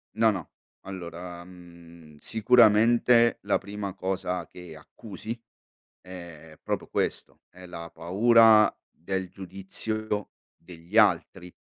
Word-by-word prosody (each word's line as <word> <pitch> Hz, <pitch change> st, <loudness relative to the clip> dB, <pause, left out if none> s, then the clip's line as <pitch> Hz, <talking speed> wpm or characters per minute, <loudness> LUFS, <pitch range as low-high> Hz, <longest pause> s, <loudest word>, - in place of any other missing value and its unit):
No, 110 Hz, 0 st, +4 dB
no, 95 Hz, -7 st, -4 dB, 0.3 s
allora, 85 Hz, -2 st, -8 dB
mhmm, 85 Hz, -3 st, -16 dB
sicuramente 115 Hz, +2 st, +4 dB
la 100 Hz, -, +1 dB
prima 100 Hz, -1 st, -7 dB
cosa 95 Hz, -1 st, -3 dB
che 90 Hz, -3 st, -12 dB
accusi 110 Hz, +7 st, -9 dB, 0.6 s
è 85 Hz, -4 st, -12 dB
proprio -, -, -3 dB
questo, -, -, -3 dB
è 90 Hz, +1 st, -14 dB
la 85 Hz, -1 st, -9 dB
paura 110 Hz, +5 st, +5 dB, 0.2 s
del 95 Hz, +2 st, -4 dB
giudizio 105 Hz, +3 st, -5 dB, 0.3 s
degli 85 Hz, +4 st, -7 dB
altri, 95 Hz, -3 st, +2 dB
95 Hz, 105 wpm, -26 LUFS, 85-110 Hz, 0.6 s, paura